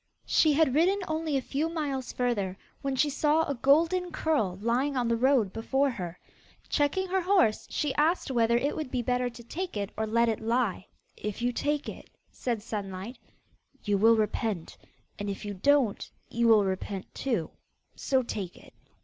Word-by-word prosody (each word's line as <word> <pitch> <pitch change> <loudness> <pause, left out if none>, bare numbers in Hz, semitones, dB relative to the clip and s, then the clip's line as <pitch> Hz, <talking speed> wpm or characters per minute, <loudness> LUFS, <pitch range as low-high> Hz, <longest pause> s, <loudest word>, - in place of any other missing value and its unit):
She 310 -2 +4
had 290 -3 +3
ridden 350 +7 +3
only 315 -2 -1
a 265 - -2
few 300 +6 -1
miles 285 -6 -3
further, 205 -7 -1 0.2
when 275 -1 -1
she 295 - +3
saw 305 +3 +2
a 280 - 0
golden 330 +8 +2
curl 290 - 0
lying 250 +6 0
on 245 -2 +1
the 230 - +2
road 240 -5 +2
before 270 +5 +1
her. 180 -7 -6 0.5
Checking 340 +6 +1
her 380 +1 +1
horse, 360 - +2
she 295 -3 -1
asked 310 0 +1
whether 235 -1 +3
it 280 +4 0
would 310 -4 -4
be 250 -1 -2
better 250 +1 0
to 235 0 -12
take 345 - -5
it 200 -1 -3
or 220 - -2
let 235 +2 +3
it 220 -2 0
lie. 230 -4 0 0.3
'If 210 +2 -5
you 245 0 +1
take 295 +3 -1
it,' - - -8 0.2
said 235 -4 -3
Sunlight, 200 +2 -5 0.6
'you 205 -2 +1
will 225 +2 +6
repent, 210 -4 -1 0.4
and 205 0 -3
if 200 +1 -5
you 205 - -4
don't, 255 +2 +2 0.2
you 235 0 +1
will 215 -3 +6
repent 190 0 -4
too: 225 -12 -2 0.4
so 265 -2 +1
take 195 -6 -5
it. - - -17
245 Hz, 180 wpm, -28 LUFS, 215-290 Hz, 0.6 s, will